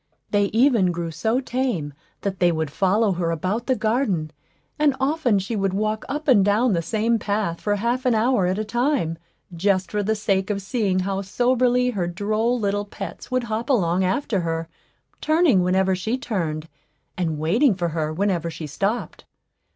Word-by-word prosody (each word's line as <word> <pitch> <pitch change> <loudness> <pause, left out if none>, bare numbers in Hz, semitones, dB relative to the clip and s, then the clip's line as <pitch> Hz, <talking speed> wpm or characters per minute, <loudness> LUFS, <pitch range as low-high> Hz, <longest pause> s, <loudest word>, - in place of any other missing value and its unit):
They 205 -1 +3
even 225 -3 +3
grew 170 -1 -4
so 225 +9 0
tame 245 - -2 0.3
that 195 -2 -3
they 175 -1 +4
would 160 -3 -2
follow 200 +6 +2
her 175 -2 -1
about 185 +8 -2
the 260 - +2
garden; 215 - 0 0.5
and 295 -3 +3
often 265 -5 +2
she 195 +4 -2
would 195 -2 0
walk 215 +1 -1
up 300 +2 -4
and 235 -8 +6
down 210 +4 +3
the 170 - +1
same 220 +6 0
path 200 -5 -2
for 205 -1 +1
half 240 +5 -1
an 245 - +3
hour 220 -4 +2
at 185 +2 0
a 215 - -1
time, 240 - 0 0.4
just 185 +1 +1
for 210 - 0
the 220 +2 0
sake 195 -2 0
of 205 -1 -1
seeing 195 -2 0
how 195 +1 -2
soberly 250 +4 +2
her 185 -6 -2
droll 215 +7 0
little 205 -1 -1
pets 200 -2 -8
would 255 -1 0
hop 230 +2 -3
along 185 -8 +2
after 195 +2 0
her, 165 -1 -2 0.5
turning 310 - +3
whenever 190 +1 +2
she 220 +7 -2
turned, 165 - -3 0.5
and 165 -4 -1
waiting 200 - +3
for 175 -2 -1
her 155 -1 -2
whenever 175 -1 0
she 160 -1 -7
stopped. 200 - -3
205 Hz, 180 wpm, -23 LUFS, 180-235 Hz, 0.5 s, and